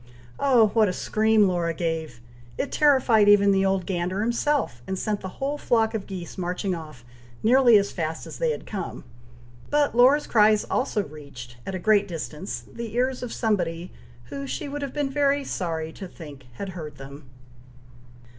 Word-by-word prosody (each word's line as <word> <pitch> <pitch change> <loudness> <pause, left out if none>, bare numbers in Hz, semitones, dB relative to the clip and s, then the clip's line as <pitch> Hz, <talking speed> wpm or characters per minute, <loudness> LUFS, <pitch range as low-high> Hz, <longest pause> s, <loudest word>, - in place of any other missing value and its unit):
oh, 245 -6 +4
what 220 0 +3
a - - -2
scream 215 +1 +2
Laura 170 -2 -1
gave! 160 -7 -3 0.4
it 280 - -2
terrified 255 -8 +4
even 200 -1 +6
the 195 0 +3
old 190 -2 +1
gander 185 +1 -2
himself, 235 - 0
and 190 - -2
sent 210 +1 -2
the 190 - -5
whole 285 +2 -2
flock 225 -2 +1
of 215 -3 -4
geese 185 -1 -7
marching 180 +2 -2
off, 155 -7 -9 0.4
nearly 240 0 +6
as 200 0 0
fast 160 -2 -4
as - - -9
they - - +1
had 465 - -4
come; 195 -4 -6 0.7
but 290 -4 +2
Laura's 265 +5 +5
cries 215 -1 +4
also 245 -5 -1
reached, 140 -7 -11
at 195 - -3
a - - -1
great 205 +1 +3
distance, 165 +1 -5
the 235 -2 -6
ears 255 +1 0
of 245 -2 -5
somebody, 175 -6 -1 0.4
who 275 0 -5
she 285 - -4
would 290 +1 -5
have 280 -2 -4
been 285 -1 -2
very 285 0 +2
sorry 160 -8 -3
to 195 - -8
think 145 -7 -12
had 195 +10 -6
heard 155 -6 -8
them. 140 0 -11
200 Hz, 175 wpm, -25 LUFS, 170-245 Hz, 0.7 s, even